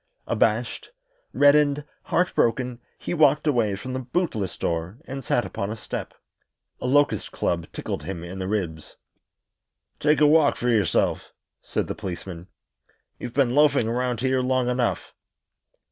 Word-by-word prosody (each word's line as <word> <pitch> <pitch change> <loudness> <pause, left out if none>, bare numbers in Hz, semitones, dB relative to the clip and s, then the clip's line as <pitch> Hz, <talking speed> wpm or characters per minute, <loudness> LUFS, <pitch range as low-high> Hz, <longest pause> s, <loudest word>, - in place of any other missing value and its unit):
Abashed, - - 0 0.4
reddened, 145 0 +4 0.2
heartbroken, 125 -8 +1 0.2
he - - -4
walked 150 -2 +4
away 120 -9 +2
from 130 +6 -6
the 130 - -2
bootless 125 - -2
door 85 +5 -2
and 135 0 -6
sat 120 - +1
upon 100 - -4
a 110 - -3
step. 110 - -6 0.6
A - - -3
locust 145 +2 +2
club 85 -1 -1
tickled - - -4
him 85 +2 -6
in 90 +2 -7
the 95 - -3
ribs. 90 -7 -3 1.0
"Take 150 -1 +3
a 150 - +6
walk 150 0 +5
for 125 - -1
yourself," 110 -4 +1 0.3
said - - -2
the - - -4
policeman. 90 -3 -7 0.7
"You've 120 - -7
been 135 -4 +3
loafing 145 -5 +4
around 120 0 -1
here 130 0 +2
long 130 -1 +1
enough." 125 -1 -1
125 Hz, 145 wpm, -24 LUFS, 100-140 Hz, 1.0 s, a